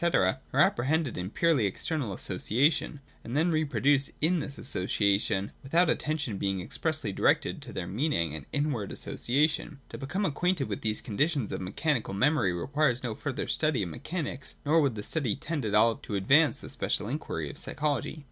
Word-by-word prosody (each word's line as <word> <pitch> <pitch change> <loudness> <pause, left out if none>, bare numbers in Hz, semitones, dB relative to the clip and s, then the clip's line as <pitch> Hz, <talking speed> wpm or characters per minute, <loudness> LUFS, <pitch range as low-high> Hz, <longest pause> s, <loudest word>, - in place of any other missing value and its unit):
are 95 - +2 0.2
apprehended 140 +2 +2
in 90 - -3
their 100 - -12
purely 155 -11 +3
external 135 - -2
association, 140 - 0 0.2
and 120 +5 -3
then 165 +3 +3
reproduced 145 -3 +2
in 170 +3 +2
this 145 -2 -5
association, 100 -3 +1
without 165 +5 +3
attention 150 -10 -2
being 95 -1 0
expressly 155 - -2
directed 150 +5 +1
to 130 -4 -8
their 95 -4 -4
meaning 95 - 0
and 80 - -7
inward 145 -9 -1
association. 150 +3 0
To - - -8
become 185 +9 -2
acquainted 175 -1 0
with 100 - -3
these 110 -1 -1
conditions 135 +2 0
of - - -3
mechanical 115 - -1
memory 130 - +3
requires 130 - 0
no 120 -3 -2
further 140 +4 -4
study 155 -8 +1
of 90 - -4
mechanics, 140 - -5
nor 160 +3 +4
would 135 -6 +1
that 105 - -5
study 135 -10 0
tend 155 -5 -3
at 105 - 0
all 115 +2 +5
to 105 - -6
advance 145 +11 +4
the - - -9
special 105 - -1
inquiry 80 - -3
of - - -11
psychology. 150 +1 -2
135 Hz, 175 wpm, -29 LUFS, 105-155 Hz, 0.2 s, all